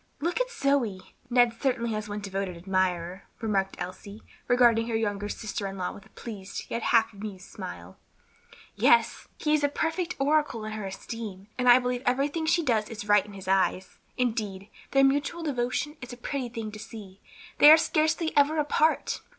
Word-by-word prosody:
"Look 345 Hz, +10 st, 0 dB
at -, -, -1 dB
Zoe; 275 Hz, -, -1 dB, 0.2 s
Ned 245 Hz, -1 st, +4 dB
certainly 245 Hz, -4 st, 0 dB
has 215 Hz, -1 st, -4 dB
one 205 Hz, 0 st, -4 dB
devoted 195 Hz, -2 st, -4 dB
admirer," 185 Hz, 0 st, -1 dB
remarked 195 Hz, -4 st, 0 dB
Elsie, 200 Hz, +4 st, -8 dB, 0.2 s
regarding 235 Hz, -2 st, +4 dB
her 230 Hz, -, -1 dB
young 205 Hz, -3 st, -1 dB
sister 210 Hz, -2 st, -4 dB
in 195 Hz, 0 st, -7 dB
law 180 Hz, -1 st, -2 dB
with 200 Hz, -, -13 dB
a -, -, -28 dB
pleased 205 Hz, -5 st, -7 dB
yet 230 Hz, -, -2 dB
half 225 Hz, 0 st, +3 dB
amused 200 Hz, -2 st, -8 dB
smile. 90 Hz, +1 st, -9 dB, 0.8 s
"Yes," 235 Hz, -1 st, +5 dB
said -, -, -13 dB
Violet, -, -, -18 dB
"he 300 Hz, -, +2 dB
is 300 Hz, -1 st, +2 dB
a 285 Hz, -, +3 dB
perfect 325 Hz, +4 st, -2 dB
oracle 285 Hz, -6 st, +1 dB
in 215 Hz, -, -5 dB
her 215 Hz, -2 st, -4 dB
esteem; 200 Hz, 0 st, -7 dB
and 250 Hz, 0 st, +2 dB
I 245 Hz, -, +9 dB
believe 250 Hz, -1 st, -1 dB
everything 285 Hz, +5 st, 0 dB
she 340 Hz, +1 st, +3 dB
does 225 Hz, -6 st, +1 dB
is 210 Hz, -2 st, -7 dB
right 205 Hz, -1 st, +5 dB
in 205 Hz, 0 st, -13 dB
his 195 Hz, -1 st, -10 dB
eyes; 190 Hz, -1 st, 0 dB, 0.2 s
indeed, 215 Hz, -5 st, -2 dB, 0.2 s
their 275 Hz, 0 st, +4 dB
mutual 290 Hz, +5 st, +1 dB
devotion 280 Hz, +1 st, -2 dB
is 245 Hz, -, -8 dB
a 245 Hz, -, -8 dB
pretty 255 Hz, 0 st, -4 dB
thing 225 Hz, -2 st, -5 dB
to 215 Hz, -, -9 dB
see. 205 Hz, -3 st, -10 dB, 0.4 s
They 295 Hz, -, +10 dB
are 315 Hz, -, +10 dB
scarcely 315 Hz, 0 st, +1 dB
ever 290 Hz, +2 st, +4 dB
apart." 305 Hz, +1 st, +1 dB
225 Hz, 190 wpm, -27 LUFS, 200-275 Hz, 0.8 s, They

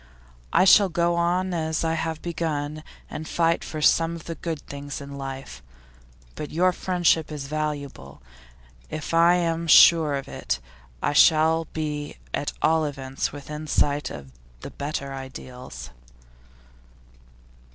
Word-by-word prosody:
'I -, -, +4 dB
shall 195 Hz, +1 st, +7 dB
go 170 Hz, +1 st, +1 dB
on 175 Hz, +2 st, 0 dB
as 160 Hz, -1 st, -1 dB
I 165 Hz, 0 st, +1 dB
have 160 Hz, -1 st, -3 dB
begun, 155 Hz, -3 st, -3 dB, 0.3 s
and 155 Hz, -, -7 dB
fight 165 Hz, 0 st, +1 dB
for 155 Hz, -1 st, -5 dB
some 165 Hz, +2 st, +3 dB
of 165 Hz, -, -9 dB
the 165 Hz, -, -5 dB
good 165 Hz, -2 st, -4 dB
things 140 Hz, 0 st, -7 dB
of 140 Hz, 0 st, -9 dB
life. 135 Hz, -, -7 dB, 0.7 s
But 150 Hz, -, -6 dB
your 180 Hz, +4 st, +2 dB
friendship 175 Hz, -4 st, +1 dB
is 145 Hz, -2 st, -5 dB
valuable. 145 Hz, -, -4 dB, 0.7 s
If 155 Hz, +1 st, -5 dB
I 170 Hz, +1 st, +6 dB
am 165 Hz, -1 st, -1 dB
sure 160 Hz, -3 st, +7 dB
of 135 Hz, -, -5 dB
it, 65 Hz, -, -3 dB, 0.4 s
I -, -, +1 dB
shall 160 Hz, +1 st, +5 dB
be 150 Hz, -2 st, -4 dB, 0.2 s
at -, -, -1 dB
all 160 Hz, 0 st, +3 dB
events 135 Hz, -2 st, -3 dB
within 150 Hz, +2 st, -7 dB
sight 145 Hz, 0 st, +1 dB
of 70 Hz, -2 st, -9 dB, 0.3 s
the -, -, -8 dB
better 140 Hz, -1 st, -4 dB
ideals. 130 Hz, -, -9 dB
155 Hz, 140 wpm, -25 LUFS, 140-165 Hz, 0.7 s, shall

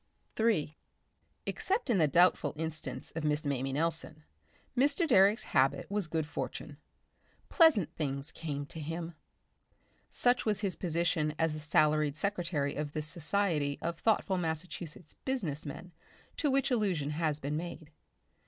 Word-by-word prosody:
Section -, -, -40 dB
3 160 Hz, -9 st, +1 dB, 0.7 s
Except 395 Hz, -, -1 dB
in 205 Hz, -, +3 dB
the 155 Hz, -, +5 dB
doubtful 175 Hz, +6 st, +4 dB
instance 150 Hz, -5 st, -4 dB
of 165 Hz, -, -3 dB
Miss 150 Hz, 0 st, 0 dB
Mamie 135 Hz, -1 st, -1 dB
Nelson, 160 Hz, 0 st, -1 dB, 0.5 s
Mr. 290 Hz, +6 st, +3 dB
Direck's 205 Hz, -4 st, +5 dB
habit 135 Hz, +5 st, +1 dB
was 205 Hz, -4 st, 0 dB
good 160 Hz, -1 st, -1 dB
fortune. 145 Hz, +1 st, -5 dB, 0.7 s
Pleasant 320 Hz, -, +5 dB
things 140 Hz, -1 st, -3 dB
came 145 Hz, -4 st, -4 dB
to 160 Hz, -, -9 dB
him. 165 Hz, +2 st, -4 dB, 1.0 s
Such 245 Hz, 0 st, +2 dB
was 210 Hz, -2 st, 0 dB
his 195 Hz, -3 st, 0 dB
position 165 Hz, -3 st, 0 dB
as 165 Hz, -1 st, +1 dB
the 155 Hz, -, -5 dB
salaried 150 Hz, -1 st, +2 dB
secretary 170 Hz, -8 st, -1 dB
of 150 Hz, 0 st, -4 dB
this 155 Hz, -1 st, -3 dB
society 155 Hz, -3 st, 0 dB
of 170 Hz, 0 st, -3 dB
thoughtful 205 Hz, -4 st, +2 dB
Massachusetts 165 Hz, 0 st, -4 dB
business 170 Hz, -, -2 dB
men 170 Hz, +5 st, -8 dB, 0.4 s
to 300 Hz, -, +1 dB
which 275 Hz, 0 st, +2 dB
allusion 185 Hz, -, +1 dB
has 155 Hz, -1 st, 0 dB
been 145 Hz, +1 st, -3 dB
made. 165 Hz, -1 st, -6 dB
160 Hz, 145 wpm, -32 LUFS, 150-190 Hz, 1.0 s, the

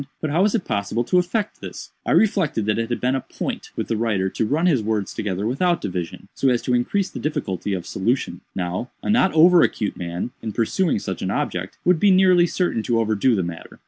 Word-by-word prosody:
"But 155 Hz, -, -2 dB
how 165 Hz, +5 st, +2 dB
was 205 Hz, +2 st, +3 dB
it 205 Hz, -, -1 dB
possible 100 Hz, +3 st, -1 dB
to 180 Hz, +9 st, +3 dB
effect 200 Hz, +4 st, -2 dB
this?" -, -, -8 dB, 0.2 s
"I -, -, +1 dB
reflected 190 Hz, -, +2 dB
that 105 Hz, +1 st, +1 dB
it 115 Hz, 0 st, -2 dB
had 120 Hz, -, -1 dB
been 125 Hz, +1 st, +1 dB
a 135 Hz, -, 0 dB
point -, -, -5 dB
with -, -, -3 dB
the 115 Hz, -, -1 dB
writer 105 Hz, -4 st, 0 dB
to 110 Hz, -, -1 dB
run 155 Hz, +7 st, +1 dB
his 150 Hz, -10 st, +3 dB
words 105 Hz, -2 st, -2 dB
together 100 Hz, -1 st, -3 dB
without 170 Hz, +9 st, +1 dB
division, 90 Hz, -4 st, -5 dB
so 135 Hz, -, +1 dB
as 120 Hz, -2 st, +1 dB
to 125 Hz, -, 0 dB
increase 180 Hz, +11 st, 0 dB
the -, -, -6 dB
difficulty 105 Hz, -, -2 dB
of 90 Hz, -, -5 dB
solution. 120 Hz, +7 st, -1 dB
Now, 90 Hz, +6 st, -3 dB
a -, -, 0 dB
not 215 Hz, -4 st, +4 dB
over 170 Hz, +2 st, +7 dB
acute 105 Hz, -, 0 dB
man, 90 Hz, +6 st, -4 dB
in 110 Hz, -2 st, -5 dB
pursuing 150 Hz, -, +1 dB
such 95 Hz, -2 st, -5 dB
an 95 Hz, -, -2 dB
object, 90 Hz, -1 st, -3 dB
would 180 Hz, -2 st, +4 dB
be 205 Hz, -, +4 dB
nearly 185 Hz, -2 st, +5 dB
certain 175 Hz, -8 st, 0 dB
to 115 Hz, +1 st, 0 dB
overdo 110 Hz, +2 st, +2 dB
the 95 Hz, -, 0 dB
matter. 85 Hz, -1 st, -8 dB
120 Hz, 230 wpm, -22 LUFS, -, 0.2 s, over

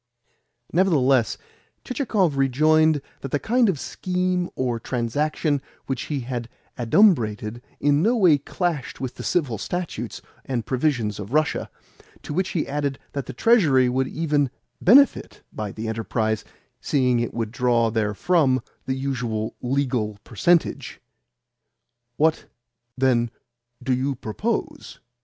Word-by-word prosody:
Nevertheless 135 Hz, -, +3 dB, 0.5 s
Chichikov 215 Hz, -, 0 dB
rejoined 155 Hz, +3 st, +3 dB, 0.2 s
that 135 Hz, -, -6 dB
the 145 Hz, -, +1 dB
kind 235 Hz, -, +2 dB
of 165 Hz, -7 st, -1 dB
scheme 180 Hz, +1 st, -1 dB
or 125 Hz, -3 st, -1 dB
transaction 140 Hz, +5 st, -1 dB, 0.2 s
which 135 Hz, 0 st, -3 dB
he 145 Hz, -3 st, -1 dB
had 120 Hz, -1 st, -5 dB, 0.3 s
adumbrated 120 Hz, -, +2 dB, 0.2 s
in 145 Hz, +1 st, +3 dB
no 230 Hz, +7 st, +3 dB
way 175 Hz, -9 st, +5 dB
clashed 160 Hz, -1 st, -3 dB
with 130 Hz, -2 st, -4 dB
the -, -, -9 dB
Civil 135 Hz, -, 0 dB
Statutes 175 Hz, -1 st, -4 dB, 0.2 s
and 120 Hz, -4 st, -3 dB
Provisions 125 Hz, -7 st, 0 dB
of 105 Hz, +5 st, -7 dB
Russia; 155 Hz, 0 st, +1 dB, 0.5 s
to -, -, -5 dB
which 185 Hz, +3 st, 0 dB
he 165 Hz, -, -1 dB
added 140 Hz, -1 st, -2 dB, 0.2 s
that 140 Hz, -2 st, -4 dB
the -, -, -4 dB
Treasury 145 Hz, -, +4 dB
would 130 Hz, +1 st, 0 dB
even 145 Hz, -3 st, 0 dB, 0.3 s
BENEFIT 270 Hz, +8 st, +4 dB
by 105 Hz, -2 st, -4 dB
the 110 Hz, +2 st, -6 dB
enterprise, 110 Hz, -1 st, -1 dB, 0.4 s
seeing 125 Hz, -4 st, +1 dB
it 120 Hz, -, -1 dB
would 115 Hz, -2 st, -2 dB
draw 120 Hz, -2 st, +2 dB
therefrom 130 Hz, -, +1 dB, 0.2 s
the 130 Hz, -, 0 dB
usual 125 Hz, -5 st, -3 dB
legal 125 Hz, -5 st, -1 dB
percentage. 170 Hz, -, +1 dB, 1.2 s
"What, 160 Hz, +1 st, +2 dB, 0.5 s
then, 125 Hz, -3 st, +2 dB, 0.5 s
do 130 Hz, 0 st, +1 dB
you 135 Hz, +2 st, 0 dB
propose?" 110 Hz, -3 st, -4 dB
135 Hz, 125 wpm, -23 LUFS, 120-155 Hz, 1.2 s, way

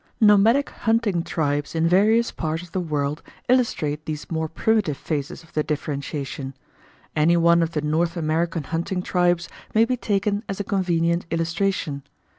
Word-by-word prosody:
Nomadic 220 Hz, +5 st, +5 dB
hunting 225 Hz, -6 st, +1 dB
tribes 145 Hz, -2 st, -2 dB
in 165 Hz, 0 st, +2 dB
various 215 Hz, +6 st, +4 dB
parts 160 Hz, +1 st, -3 dB
of 175 Hz, -, -13 dB
the 185 Hz, -, -1 dB
world 150 Hz, -3 st, -2 dB, 0.3 s
illustrate 155 Hz, -, +1 dB
these 155 Hz, +1 st, -5 dB
more 160 Hz, -1 st, -1 dB
primitive 200 Hz, -4 st, +1 dB
phases 145 Hz, -2 st, -4 dB
of 160 Hz, -, -21 dB
the 155 Hz, -, +1 dB
differentiation. 140 Hz, -2 st, -4 dB, 0.6 s
Any 165 Hz, +3 st, +4 dB
one 170 Hz, 0 st, +5 dB
of 165 Hz, 0 st, -1 dB
the 150 Hz, -, 0 dB
North 165 Hz, +3 st, 0 dB
American 165 Hz, 0 st, 0 dB
hunting 170 Hz, +5 st, -2 dB
tribes 175 Hz, -2 st, +1 dB, 0.3 s
may 225 Hz, +1 st, +6 dB
be 250 Hz, +1 st, -1 dB
taken 205 Hz, -1 st, 0 dB
as 195 Hz, -, -3 dB
a -, -, 0 dB
convenient 170 Hz, -3 st, 0 dB
illustration. 165 Hz, -3 st, -1 dB
170 Hz, 155 wpm, -23 LUFS, 155-195 Hz, 0.6 s, may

